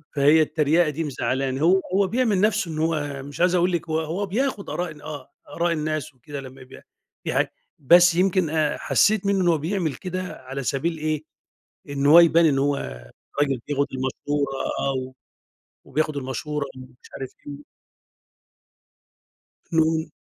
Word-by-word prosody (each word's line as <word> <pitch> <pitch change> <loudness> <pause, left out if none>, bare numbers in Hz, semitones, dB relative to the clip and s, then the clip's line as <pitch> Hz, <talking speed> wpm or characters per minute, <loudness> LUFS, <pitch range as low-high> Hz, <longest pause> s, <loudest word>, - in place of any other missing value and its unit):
فهي 145 +3 +5
التريقة 155 +2 +2
دي 160 +3 -3
مزعلاني، 135 -1 -2
هو 185 +4 +4
هو 195 0 +3
بيعمل 225 -5 +1
نفسُه 215 -5 +1
إن 155 - -5
هو 145 -4 -1
مش 145 +2 -10
عايز 180 0 +4
أقول 180 +1 +2
لِك 170 -1 -2
هو 160 0 +1
هو 165 +6 -2
بياخذ 215 +1 -2
آراء 175 -1 -3
ال 150 -1 -13
آه، 145 -3 -8 0.2
آراء 170 0 +1
الناس 155 -1 -3
وكده 140 +2 -8
لمّا 130 0 -11
بي 130 - -14 0.4
دي - - -1
حاجة - - 0 0.3
بس 175 +4 +6
يمكن 185 -2 +2
أ 155 -1 0
حسيت 210 -2 +2
منه 200 -1 +2
إن 175 - +2
هو 165 -2 +4
بيعمل 160 -2 -2
كده 185 +2 -4 0.3
على 135 0 -4
سبيل 160 +6 -1
إيه، 155 0 -2 0.7
إن 140 0 -2
هو 160 +4 +9
يبان 170 0 +6
إن 135 -3 +3
هو 140 +1 +2 0.7
راجل 135 -4 +1
بياخد 140 0 +1
بالمشورة، 135 +2 -2 0.3
آه، 135 - 0
و 130 0 -4 0.7
وبياخد 155 -1 -1
المشورة 140 +2 -3
ومش 130 0 -14
عارف 130 - -5 0.2
إيه. 145 +1 -8 2.1
امم. 160 0 +2
155 Hz, 165 wpm, -24 LUFS, 140-175 Hz, 2.1 s, هو